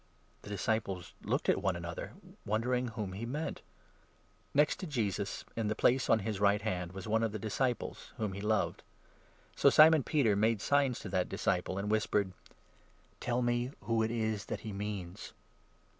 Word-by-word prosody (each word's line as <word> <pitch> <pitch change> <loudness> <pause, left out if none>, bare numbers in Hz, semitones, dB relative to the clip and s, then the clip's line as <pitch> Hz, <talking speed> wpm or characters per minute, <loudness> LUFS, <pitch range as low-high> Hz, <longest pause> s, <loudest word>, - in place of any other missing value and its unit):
The - - -11
disciples 100 -3 -2
looked - - -1
at - - +3
one 95 -2 +1
another, 85 -1 -6 0.3
wondering 125 +4 0
whom 110 -5 -4
he 100 +4 -5
22 - - -3
meant. 150 +6 -3 0.9
Next 150 +1 +3
to 185 - -5
Jesus, 105 - -2
in 115 -2 -1
the 110 - 0
place 130 +4 +3
on - - +6
his 105 0 -3
right 100 0 +4
hand, 90 -5 -2
was 95 0 -6
23 105 - -5
one 110 0 +3
of 110 -2 0
his 110 - -4
disciples, 120 +3 -2
whom 105 -3 -2
he 100 - -6
loved. 110 0 0 0.7
So - - +6
Simon 155 0 +7
Peter 130 -7 +2
made 110 +2 +3
24 - - -6
signs 140 -3 +2
to - - -6
that 90 -1 0
disciple, 95 -2 0
and 100 +2 -2
whispered: 105 -3 +1 0.4
" - - -33
Tell 125 +1 0
me 120 +2 0
who 115 -1 +1
it 110 - +1
is 110 -2 -1
that - - -4
he 110 -2 -6
means." 100 -1 -5
110 Hz, 190 wpm, -32 LUFS, 100-120 Hz, 0.9 s, Simon